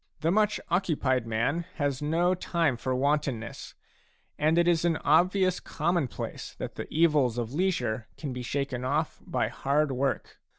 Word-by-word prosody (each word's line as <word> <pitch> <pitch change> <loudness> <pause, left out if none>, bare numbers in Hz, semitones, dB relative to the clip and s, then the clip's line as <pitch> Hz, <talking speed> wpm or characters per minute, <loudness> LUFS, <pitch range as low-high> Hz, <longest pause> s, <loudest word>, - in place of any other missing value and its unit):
The 165 - +2
much 210 +1 +2
occupied 140 - +1
man 125 +10 0
has 145 -3 -1
no 170 +4 +2
time 170 -6 0
for 130 +2 -2
wantonness, 135 -4 -1 0.6
and 155 +2 +2
it 170 0 +4
is 170 -2 +3
an 170 -2 +2
obvious 185 +4 +3
commonplace 165 -4 -2
that - - -5
the - - -7
evils 150 -7 +3
of 120 +1 -3
leisure 125 -10 0
can 145 -5 -4
be 125 - -5
shaken 130 0 -2
off 150 +5 -1
by - - -1
hard 145 +1 +1
work. 135 +1 -2
150 Hz, 155 wpm, -28 LUFS, 130-170 Hz, 0.6 s, it